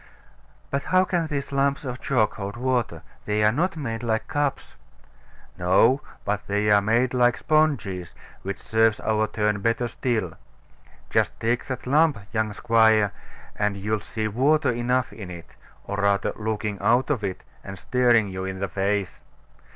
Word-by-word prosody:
But 140 - 0
how 185 0 +3
can 175 -3 -1
these 140 -3 -4
lumps 140 +1 0
of 125 -1 -5
chalk 115 -6 +1
hold 100 +1 -6
water? 125 -2 -1 0.2
They 105 0 0
are 105 - +5
not 170 - -1
made 115 -7 -4
like 110 -2 -1
cups. 145 -2 -2 0.9
No: 105 +10 +4 0.2
but 105 0 -2
they 105 +1 +1
are 100 0 +6
made 115 +5 +1
like 120 -1 +3
sponges, 120 - 0 0.3
which 100 +1 -4
serves 110 -1 +2
our 110 0 +1
turn 105 -2 -1
better 115 +3 0
still. 110 -8 -2 0.8
Just - - +1
take 115 +2 0
up - - -18 0.2
that - - -11
lump, 150 +1 +3 0.2
young 110 -1 0
squire, 110 -2 +3 0.4
and 105 -1 -1
you'll 105 +2 -1
see 110 +1 -4
water 135 +9 +2
enough 125 +2 0
in 100 -5 -8
it, 85 -2 -10 0.3
or 100 - -5
rather 100 0 +1
looking 105 -1 -3
out 125 +5 +2
of 125 -7 -1
it, 95 -2 -4 0.2
and 100 -1 -8
staring 120 -3 +3
you 95 -1 -5
in 95 0 -4
the 100 - -1
face. 100 0 -2
110 Hz, 165 wpm, -24 LUFS, 100-125 Hz, 0.9 s, are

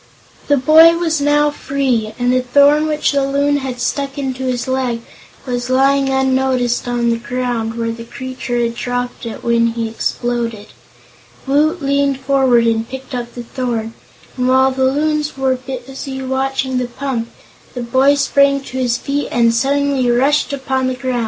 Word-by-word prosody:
The 285 - +3
boy 320 +5 +6
was 325 -3 0
now 295 +1 +3
free, 260 -7 -1
and 245 0 +1
the 255 - +2
thorn 285 +4 +4
which 300 -1 0
the 280 -1 +1
Loon 285 +1 +1
had 260 -3 -5
stuck 275 +2 -2
into 265 -2 -3
his 250 -1 -2
leg 255 -3 -1 0.4
was 245 -1 -3
lying 270 +1 +3
unnoticed 260 -2 +1
on 240 -1 0
the 230 - 0
ground, 240 -2 -3
where 230 -1 -2
the 230 0 -7
creature 255 -1 -5
had 235 -1 0
dropped 245 0 -4
it 225 - -7
when 235 0 +2
he 230 -1 -2
exploded. 230 -1 -3 0.8
Woot 300 +4 +1
leaned 280 -1 +1
forward 265 -3 +3
and 225 0 0
picked 265 +1 -8
up 240 -1 -5
the 240 - -6
thorn, 235 -2 -3 0.4
and 250 0 0
while 260 +1 +4
the 260 0 0
Loons 300 +2 0
were 265 -1 +1
busy 265 +1 -7
watching 265 0 -1
the 250 - -2
pump, 245 -2 -4 0.5
the 245 - -4
boy 265 +4 +3
sprang 280 0 +3
to 260 -1 -6
his 245 -2 +1
feet 285 +3 -2
and 235 -1 +3
suddenly 275 +1 +1
rushed 275 +5 +2
upon 265 -1 -1
the 255 - -1
group. 255 -1 -2
260 Hz, 170 wpm, -17 LUFS, 245-275 Hz, 0.8 s, boy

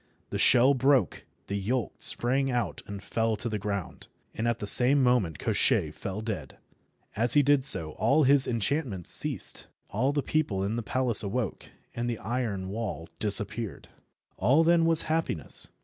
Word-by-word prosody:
The - - -4
shell 130 +2 +4
broke, 135 0 0 0.2
the 100 - -6
yolk 115 +4 -4
sprang 135 +3 0
out 120 -2 -4
and 100 -1 -9
fell 115 +1 -2
to 120 +3 -7
the 110 -2 -4
ground, 100 -3 -6 0.3
and 110 - -4
at 120 -1 -1
the 105 - -7
same 130 +6 +6
moment 115 - 0
Koshchei - - 0
fell 100 +2 -7
dead. 110 -3 -7 0.6
As 120 +4 +2
he 145 - +4
did 140 -1 +1
so 85 -11 +6
all 150 - 0
his 140 0 +7
enchantments 115 - -1
ceased. - - +1 0.2
All 125 +7 -1
the 145 -1 -3
people 125 -11 -2
in 100 +3 -3
the 120 - -4
palace 125 0 +4
awoke, 110 +2 -5 0.2
and 120 +1 -4
the 115 - -4
iron 105 -4 -5
wall 100 -6 -6
disappeared. 105 0 0 0.5
All 135 - +2
then 165 0 +2
was 165 -1 +3
happiness. 155 - -3
120 Hz, 165 wpm, -26 LUFS, 100-135 Hz, 0.6 s, his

